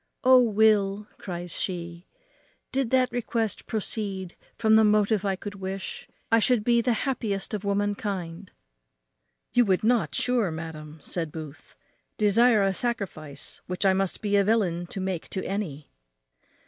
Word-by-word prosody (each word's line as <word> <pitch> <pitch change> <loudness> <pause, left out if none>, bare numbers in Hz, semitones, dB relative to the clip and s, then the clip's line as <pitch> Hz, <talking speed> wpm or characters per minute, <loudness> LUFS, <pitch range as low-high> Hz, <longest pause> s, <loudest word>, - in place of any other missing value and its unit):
"O 255 0 +8
Will," 210 -2 +3
cries 175 -2 -6
she, 170 -1 -4 0.6
"did 265 -3 0
that 255 0 +3
request 230 -3 -2
proceed 200 -4 -3 0.2
from 220 -1 +4
the 220 - +6
motive 210 -1 +3
I 195 -1 0
could 205 +2 -7
wish, 195 -1 -6 0.2
I 225 - +6
should 230 -1 +3
be 235 +1 +3
the 245 +1 +1
happiest 220 -7 -2
of 210 -1 -3
womankind." 200 -3 -2 1.0
"You 245 - +5
would 190 -1 +1
not, 235 +1 +2
sure, 245 -6 +1
madam," 160 -1 -7
said 165 -4 -4
Booth, 155 -2 -10 0.4
"desire 215 +1 +4
a 195 0 +2
sacrifice 185 - -4
which 180 +2 -2
I 190 - +5
must 190 +1 -1
be 205 -1 +1
a 200 - +4
villain 190 -5 +1
to 195 - -6
make 185 -3 -3
to 190 - -4
any?" 180 -8 -4
200 Hz, 150 wpm, -26 LUFS, 180-220 Hz, 1.0 s, O